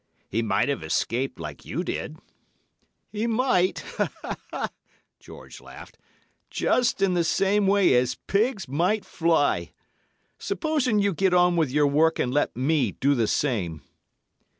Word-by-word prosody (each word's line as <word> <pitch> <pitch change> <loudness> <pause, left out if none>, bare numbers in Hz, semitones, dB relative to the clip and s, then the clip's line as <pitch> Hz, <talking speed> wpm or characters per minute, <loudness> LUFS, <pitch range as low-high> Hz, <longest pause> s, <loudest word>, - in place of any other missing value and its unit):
"'He 115 - 0
might 105 0 +1
have 140 -10 -2
escaped 115 +11 -2
like 75 -4 -8
you - - -4
did.' - - -5 0.9
"'He 215 +2 -2
might,' 225 -6 +1 1.4
George - - -13
laughed, - - -13 0.5
'just 245 -5 +1
in 190 -2 +2
the 175 -1 +2
same 195 +4 +2
way 195 -4 +4
as 125 0 +2
pigs 210 -1 0
might 180 +10 0
fly. 165 -3 +1 0.7
Supposing 310 - 0
you 200 -1 +2
get 185 +2 +2
on 180 0 +4
with 160 -5 +1
your 145 +3 +2
work 155 +3 +3
and 125 - -1
let 145 - 0
me 135 -4 +1
do 140 +2 +1
the 115 -5 +1
same. 95 - -1
165 Hz, 135 wpm, -25 LUFS, 130-200 Hz, 1.4 s, way